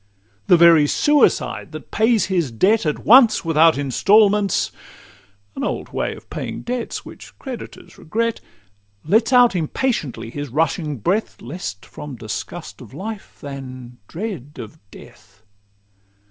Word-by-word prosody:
The 175 - +6
very 165 -3 +6
Suicide 295 - +1
that - - -10
pays 225 0 +2
his 175 -7 0
debt 185 - +2
At 150 - -3
once 230 -4 +6
without 165 -1 +4
instalments 200 - +3 0.8
(an - - -4
old - - -3
way - - -3
Of - - -15
paying - - -5
debts, 245 -1 -4
which - - -13
creditors 260 -4 -9
regret) 230 +7 -2 0.6
Lets 220 - +2
out 245 -4 +5
impatiently 155 - -2
his 145 +1 -6
rushing 150 +1 -1
breath, 190 - -1
Less 125 - -6
from 150 -3 -9
disgust 115 +10 -7
of 125 0 -13
life 210 +4 -7
than 130 -3 -9
dread 170 - -6
of 110 -2 -9
death. 105 -4 -17
165 Hz, 130 wpm, -20 LUFS, 135-220 Hz, 0.8 s, The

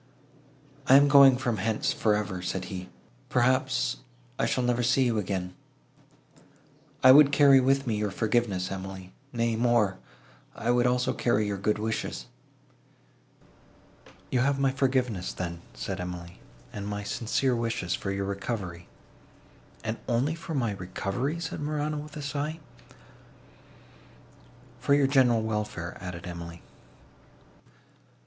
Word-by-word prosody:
"I 130 - +7
am 140 +1 +7
going 135 -2 +7
from 120 -4 -1
hence 110 +2 0
for 105 -2 +2
ever," 100 -3 -3
said 90 +1 -3
he: 90 0 -6 0.4
"perhaps, 130 +1 +1 0.4
I - - +2
shall 125 - 0
never 120 0 +1
see 125 +2 +3
you 115 -3 +1
again. 90 -2 -3 1.5
I 130 - +10
would 145 +1 +8
carry 140 -2 +6
with 135 +1 +2
me 110 -4 -1
your 105 0 -1
forgiveness, 105 -3 0
Emily; 95 -1 -7 0.2
nay 115 -1 0
more—I 115 0 -2
would 120 0 +3
also 125 +1 +1
carry 110 -4 +1
your 100 -1 -3
good 105 +2 +1
wishes." 110 +1 -3 2.1
"You 125 - +2
have 140 +2 +2
my 135 -1 +2
forgiveness, 130 -8 0
then," 85 -2 -5
said 90 +11 -4
Emily, 90 -1 -7 0.3
"and 100 -1 -5
my 105 0 -4
sincere 125 +4 0
wishes 115 -6 -2
for 100 - -3
your 100 0 -2
recovery." 100 -3 -4 1.0
"And 110 0 -3
only 125 +6 +1
for 165 -1 -6
my 120 -5 0
recovery?" 100 - -3
said 170 - -5
Morano, 150 0 -2
with 150 0 -8
a 150 - -6
sigh. 150 +3 -3 2.2
"For 140 - +3
your 145 -1 +3
general 130 -5 +3
welfare," 105 -6 -3
added 90 -1 -7
Emily. 85 -1 -8
115 Hz, 130 wpm, -27 LUFS, 95-130 Hz, 2.2 s, I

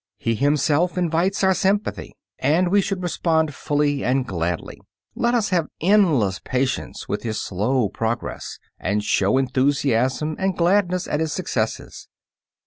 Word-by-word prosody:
He 115 +2 -1
himself 150 - +1
invites 180 +3 0
our 190 0 +5
sympathy, 195 +2 -1 0.2
and 160 +7 +2
we 200 +2 +4
should 190 -1 -3
respond 160 -3 0
fully 145 0 0
and 130 +1 +1
gladly. 85 -5 -3 0.3
Let 240 +1 +1
us 220 -3 +1
have 170 -5 +1
endless 155 - +3
patience 130 0 -2
with 105 - -2
his 110 -2 -3
slow 110 +5 0
progress, 115 +4 -4 0.2
and 105 +2 -1
show 100 +2 +2
enthusiasm 135 +2 +1
and 190 -2 0
gladness 180 0 +2
at 150 - -1
his 160 -1 -1
successes. 115 -11 -3
150 Hz, 135 wpm, -22 LUFS, 125-180 Hz, 0.3 s, our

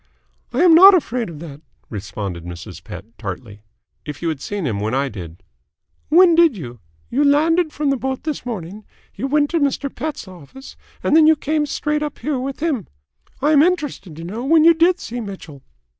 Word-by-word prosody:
"I - - +1
am 350 -2 +7
not 380 +4 +9
afraid 250 - -1
of 165 - -9
that," 150 -3 -10 0.3
responded 100 -4 -6
Mrs. 85 0 -9
Pett 90 +3 -9
tartly. 100 0 -7 0.4
"If 150 +2 -8
you 165 - 0
had 155 -4 -4
seen 205 0 -4
him 110 -7 -2
when 110 +4 -2
I 140 +1 0
did 90 -6 -10 0.3
" 80 - -46
"When 365 -2 +7
did 330 -8 +4
you? 120 - -8 0.3
You 275 +4 +2
landed 315 +3 +3
from 295 -2 -1
the 275 - 0
boat 265 +1 -4
this 310 -2 -4
morning, 210 -3 -6 0.3
you 270 - -4
went 290 +1 +1
to 335 - +1
Mr. 280 -1 -1
Pett's 310 -8 -5
office, 185 - -13 0.3
and - - +2
then 315 0 +7
came 300 0 -1
straight 300 +1 -2
up 300 -1 -4
here 290 -3 -2
with 270 +2 -5
him. 295 - -1 0.6
I 295 - +3
am 290 -2 +6
interested 295 - -1
to 165 - -9
know 210 +8 -6
when 315 +3 +4
you 335 +1 +7
did 345 +3 +3
see 240 +1 -6
Mitchell?" 190 -9 -9
255 Hz, 200 wpm, -20 LUFS, -, 0.6 s, not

